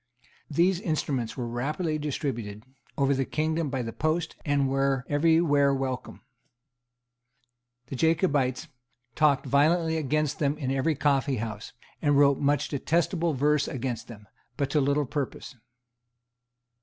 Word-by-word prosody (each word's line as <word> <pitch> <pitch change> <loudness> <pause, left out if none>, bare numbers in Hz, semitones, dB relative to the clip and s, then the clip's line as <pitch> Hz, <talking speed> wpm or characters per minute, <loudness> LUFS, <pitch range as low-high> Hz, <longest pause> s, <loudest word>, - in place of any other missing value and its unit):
These 175 +4 +2
instruments 140 - -2
were 120 -2 -3
rapidly 155 +7 -2
distributed 120 -8 -4 0.3
over 140 0 +2
the 135 0 0
kingdom 155 +2 -1
by 130 -2 -2
the 115 -1 -5
post, 160 +2 -1
and 145 -2 +1
were 135 -1 0
every 160 +3 +3
where 145 -4 +3
welcome. 130 -1 -4 1.6
The 135 - -7
Jacobites 145 -4 +1 0.5
talked 145 -1 +2
violently 160 +5 +2
against 155 -1 -1
them 145 0 0
in 135 -4 -2
every 135 +4 +1
coffeehouse, 130 -7 -1 0.3
and 145 -2 +3
wrote 140 -1 +4
much 145 +1 +1
detestable 165 +2 0
verse 145 +2 +2
against 120 -3 -4
them, 105 -3 -12 0.3
but 140 -1 -1
to 150 - +2
little 140 +2 +1
purpose. 140 -1 -4
140 Hz, 130 wpm, -27 LUFS, 130-155 Hz, 1.6 s, wrote